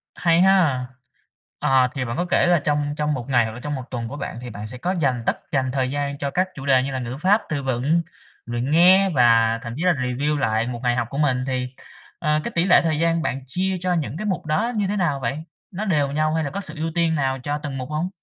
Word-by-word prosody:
Hay 170 0 +3
ha! 175 -10 +3 0.7
Ờ, 130 -1 +3
thì 130 -2 -2
bạn 115 +1 -4
có 175 - 0
kể 175 - +2
là 175 -1 +4
trong 145 -1 0
trong 150 0 0
một 125 -4 -4
ngày 120 -3 +4
hoặc 110 - -4
là 120 - -8
trong 145 +3 -4
một 130 - -5
tuần 120 -2 -3
của 145 - -7
bạn 115 - -5
thì 125 - -7
bạn 105 -1 -7
sẽ 125 +3 -8
có 175 +8 -2
dành 135 -10 0
tất - - 0
dành 130 -2 0
thời 130 -1 -1
gian 140 0 -2
cho 140 0 -3
các 185 +4 +1
chủ 135 - -8
đề 130 -2 +4
như 135 - -3
là 130 - -2
ngữ 125 +1 -5
pháp, 195 +8 +3
từ 145 -3 -2
vựng, 135 +6 +1 0.4
luyện 120 +3 -3
nghe 185 +4 +6
và 115 -6 +4
thậm 115 -2 -6
chí 160 - -3
là 180 - +4
review 135 +2 -1
lại 115 -3 0
một 120 -1 -4
ngày 120 -1 +2
học 120 - -1
của 135 - -6
mình. 130 -4 +1
Thì, 130 -1 -1 0.5
ờ, 150 -2 +1
cái - - -4
tỷ 170 +1 +2
lệ 185 - +6
thời 160 -2 0
gian 165 0 +2
bạn 135 -3 -2
chia 185 +8 -1
cho 180 0 0
những 150 -7 -2
mục 190 -5 -2
đó 205 +10 0
như 205 -2 0
thế 205 - -1
nào 155 -7 0
vậy? 130 +2 -2 0.3
Nó 200 +4 -4
đều 150 -8 +1
nhau 155 +1 +1
hay 160 0 0
là 145 - -2
có 200 +7 -4
sự - - -1
ưu 160 +1 -2
tiên 165 -1 +2
nào 135 -2 0
cho 145 +3 -2
từng 145 -2 -6
mục 130 0 -6
hông? 155 +4 -2
145 Hz, 270 wpm, -22 LUFS, 125-165 Hz, 0.7 s, nghe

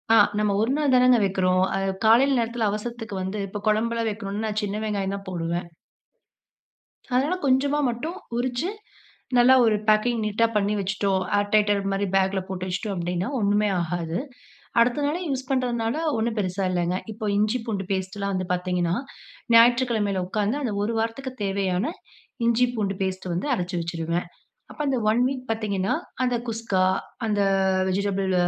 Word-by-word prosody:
ஆ, - - +7 0.2
நம்ம 210 -1 +2
ஒரு 225 +3 +1
நாள் 295 -2 +1
தானங்க 250 -1 +6
வக்கிறோம். 185 -1 +2
அ, 195 - 0 0.3
காலையில 255 +4 +5
நேரத்துல 230 -1 0
அவசரத்துக்கு 220 0 -5
வந்து, 190 +3 -3
இப்ப 205 +1 -6
கொழம்புலாம் 230 +2 +1
வைக்கணும்னா, 205 0 -4
நான் 215 0 -1
சின்ன 205 +1 -2
வெங்காயம் 200 -2 -1
தான் 195 - -8
போடுவேன். 170 0 -3 1.5
அதனால 290 +8 +2
கொஞ்சமா 275 +3 +2
மட்டும் 275 +9 -4 0.2
உரிச்சு, 250 +7 -1 0.7
நல்லா 250 +2 +7
ஒரு 220 - +3
பேக்கிங் 220 +2 +3
நீட்டா 215 +2 +2
பண்ணி 205 0 +1
வச்சுட்டோம். 195 0 0
ஆர் 205 0 0
டைட்டர் 205 -1 +3
மாதிரி, 195 +1 0
பேக்கில 190 0 +2
போட்டு 185 -1 -4
வச்சுட்டோம் 195 +2 -3
அப்படின்னா, 175 +2 -2
ஒண்ணுமே 205 0 +2
ஆகாது. 170 +1 -2 0.6
அடுத்த 245 +5 +3
நாளே, 300 +4 0
யூஸ் 260 -1 -3
பண்ணுறனால 245 -2 0 0.2
ஒண்ணும் 225 0 -1
பெருசா 190 -1 -1
இல்லைங்க. 175 0 0
இப்போ 215 0 -6
இஞ்சி, 215 +4 +2
பூண்டு 200 -4 -2
பேஸ்ட்டுலாம் 195 +1 -2
வந்து 185 -1 -1
பாத்தீங்கன்னா, 180 -1 0 0.6
ஞாயிற்றுக்கிழமையில 230 -4 +4
உட்காந்து, 210 +6 0
அந்த 225 -5 -1
ஒரு 225 +3 -1
வாரத்துக்கு 230 +4 -3
தேவையான 195 -1 0 0.6
இஞ்சி, 235 +1 +4
பூண்டு 200 -3 -1
பேஸ்ட்டு 185 -1 -3
வந்து 180 +10 -2
அரைச்சு 180 -2 -3
வச்சுடுவேன். 170 +1 -2 0.4
அப்போ - - -13
அந்த 270 -2 +1
ஒன் 230 +3 +2
வீக் 260 -2 -4
பாத்தீங்கன்னா, 200 -4 -1 0.3
அந்த 250 -1 +1
குஸ்கா, 220 -5 0 0.4
அந்த 205 -1 +1 0.5
வெஜிடபிள் 195 0 0
210 Hz, 150 wpm, -24 LUFS, 190-235 Hz, 1.5 s, ஆ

